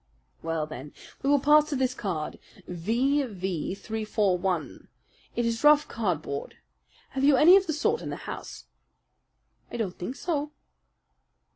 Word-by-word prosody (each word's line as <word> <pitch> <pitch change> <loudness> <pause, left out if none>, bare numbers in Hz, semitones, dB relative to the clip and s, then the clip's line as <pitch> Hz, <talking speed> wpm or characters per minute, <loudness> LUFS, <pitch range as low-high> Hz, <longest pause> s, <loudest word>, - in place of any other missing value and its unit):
"Well, 165 -1 -2
then, 150 -1 -9 0.3
we 275 - 0
will 285 0 +5
pass 300 +2 +5
to 295 - -1
this 260 -1 +1
card 175 -10 -4 0.3
V.V. 195 - -1
341. 200 -5 -1 0.5
It 240 - 0
is 230 +2 -1
rough 295 0 +6
cardboard. 165 -10 -3 0.5
Have 270 0 -3
you 280 -1 +6
any 340 +7 +8
of 390 -1 +3
the 315 - 0
sort 445 +10 0
in - - -5
the - - -3
house?" - - -7 1.1
"I - - -4
don't 200 -6 -3
think 235 +9 -4
so." 300 -2 -2
230 Hz, 140 wpm, -27 LUFS, 180-290 Hz, 1.1 s, any